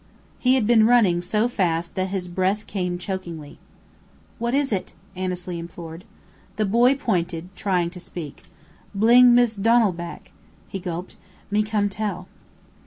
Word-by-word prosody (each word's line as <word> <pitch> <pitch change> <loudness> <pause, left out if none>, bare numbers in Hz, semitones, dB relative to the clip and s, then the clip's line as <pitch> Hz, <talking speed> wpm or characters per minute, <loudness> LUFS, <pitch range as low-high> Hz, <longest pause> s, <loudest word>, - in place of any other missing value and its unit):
He 255 +1 +4
had 255 -5 +2
been 225 -1 +5
running 210 -8 +4
so 215 +6 +1
fast 170 -7 -1
that 185 0 -1
his 190 -2 -3
breath 190 +4 -1
came 180 -3 -3
chokingly. 175 -5 -6 0.8
"What 235 +2 0
is 280 -4 +1
it?" 190 - -3 0.2
Annesley 180 -1 -4
implored. 170 +1 -9 0.5
The 215 +1 0
boy 240 +6 +4
pointed, 180 - -2
trying 180 -4 0
to 180 - -10
speak, 170 -4 -9 0.5
"Bling 240 +4 +6
Mist' 235 -4 +2
Donal 230 -1 +4
back," 170 0 -8 0.4
he 195 - -5
gulped. 175 0 -6 0.3
"Me 210 +1 +3
come 210 -1 0
tell." 195 -3 -4
190 Hz, 145 wpm, -23 LUFS, 175-220 Hz, 0.8 s, Bling